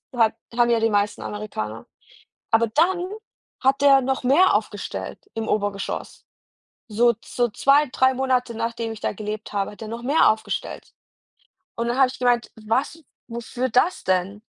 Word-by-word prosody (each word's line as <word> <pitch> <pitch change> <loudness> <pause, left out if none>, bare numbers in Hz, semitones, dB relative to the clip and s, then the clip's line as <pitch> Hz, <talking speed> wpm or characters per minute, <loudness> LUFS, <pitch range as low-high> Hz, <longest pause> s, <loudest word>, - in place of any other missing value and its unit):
hat 225 -2 +3 0.2
haben 240 0 +4
ja 235 - +3
die 225 0 +2
meisten 205 -1 0
Amerikaner.“ 115 - -5 0.7
Aber 225 +1 +4
dann 350 - +1 0.5
hat 270 +1 +2
er 275 -1 +7
noch 265 0 -1
mehr 300 +9 +5
aufgestellt - - -4
im 225 -1 -4
Obergeschoss. 205 -1 -3 0.7
So 235 +3 +3
so, 245 -1 0
2, 280 +6 +3
3 260 0 +3
Monate 255 -2 0
nachdem 230 0 -3
ich 220 - -8
da - - -1
gelebt 215 0 -6
habe, 200 -1 -1
hat 210 - -15
er 220 - -6
noch 230 +2 -6
mehr 285 +6 +4
aufgestellt. 220 0 -5 0.8
Und 235 0 -2
dann 245 +2 -1
habe 265 -1 +6
ich 260 - -9
gemeint: 245 -1 +1
„Was 255 +9 -2 0.3
wofür 235 +2 -3
das 255 +10 +2
denn?“ 190 +2 0
235 Hz, 160 wpm, -23 LUFS, 215-265 Hz, 0.8 s, er